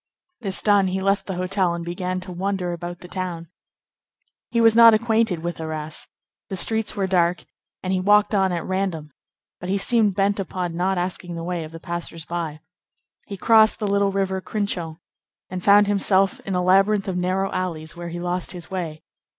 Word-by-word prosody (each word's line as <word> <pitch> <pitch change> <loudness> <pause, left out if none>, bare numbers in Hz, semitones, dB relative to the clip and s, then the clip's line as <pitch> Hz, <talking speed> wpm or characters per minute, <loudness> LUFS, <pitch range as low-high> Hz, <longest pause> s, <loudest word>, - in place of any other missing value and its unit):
This 195 -5 -3
done, 205 -2 +4
he 185 +1 -1
left 195 +1 0
the 190 - -3
hotel 185 -1 0
and 170 0 -6
began 180 +1 -3
to 185 0 -7
wander 185 0 -2
about 175 0 -7
the 180 - -10
town. 175 -3 -5 1.0
He 235 - 0
was 225 -1 +5
not 230 -1 +9
acquainted 220 -6 +1
with 175 -1 -4
Arras; 155 -1 -4 0.4
the 195 - -3
streets 220 +4 0
were 200 -2 0
dark, 180 -2 +1 0.4
and 185 0 -1
he 185 - +1
walked 205 +2 +4
on 190 -2 +3
at 170 -2 -3
random; 185 -5 -2 0.5
but 180 - -6
he 195 - +1
seemed 210 -1 +2
bent 200 +1 +1
upon 180 -2 -3
not 185 +2 0
asking 175 -1 -3
the 165 - -5
way 175 -1 -3
of 155 - -9
the 165 - -9
passers 170 -2 -6
by. 165 -3 -4 0.7
He 200 - -6
crossed 220 +2 +5
the 215 - -2
little 200 0 +2
river 190 -1 -1
Crinchon, 185 -6 -3 0.5
and 185 -1 -4
found 205 +1 +6
himself 195 -1 +2
in 195 - -1
a 180 - +1
labyrinth 195 +2 +3
of 190 - -2
narrow 185 +2 0
alleys 170 -2 -4
where 175 0 -6
he 170 +1 -5
lost 180 +1 -2
his 175 -1 -9
way. 165 -4 -4
185 Hz, 190 wpm, -23 LUFS, 175-200 Hz, 1.0 s, not